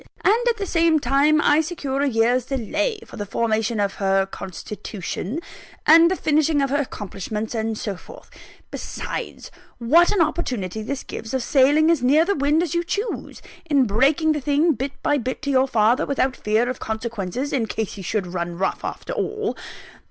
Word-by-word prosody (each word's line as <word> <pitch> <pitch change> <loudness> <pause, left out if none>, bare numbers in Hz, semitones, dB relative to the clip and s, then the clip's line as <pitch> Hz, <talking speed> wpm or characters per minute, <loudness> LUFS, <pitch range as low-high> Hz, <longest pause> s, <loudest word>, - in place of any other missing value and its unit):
And, 460 +4 +3
at 460 - 0
the 400 - -3
same 330 -3 +3
time, 285 +4 +3
I 295 +2 +4
secure 290 -5 -3
a 285 - +2
year's 240 +1 +2
delay, 305 - -2
for - - -12
the 205 - -4
formation 220 +1 0
of 200 -1 0
her 195 0 +2
constitution, 195 - -6 0.5
and 330 +2 +7
the 375 - 0
finishing 310 -2 +2
of 275 -1 0
her 285 +1 +2
accomplishments, 210 -2 -5
and 220 -1 -2
so 205 -2 -3
forth. - - -14 0.4
Besides, - - -6 0.3
what 310 +9 +4
an 410 - 0
opportunity 245 - -1
this 265 +5 -4
gives 225 +3 -6
of 260 - -1
sailing 290 +5 +4
as 330 -6 +1
near 290 +6 +4
the 400 - +1
wind 295 +2 +2
as 330 - -3
you 340 0 +1
choose, 410 +6 -4 0.3
in 280 -3 +4
breaking 280 +9 +2
the 300 -1 -1
thing, 295 +4 +2
bit 275 -1 -3
by 290 - +2
bit, 255 +1 -4
to 280 - -1
your 265 0 +3
father, 230 0 +2
without 270 -1 0
fear 215 +3 +1
of 255 0 -4
consequences, 220 +3 -4
in 240 -5 0
case 220 -1 -3
he 200 - -8
should 195 +1 -2
run 175 -1 -4
rough 190 +1 -1
after - - -5
all. 430 0 -2
265 Hz, 185 wpm, -22 LUFS, 220-310 Hz, 0.5 s, and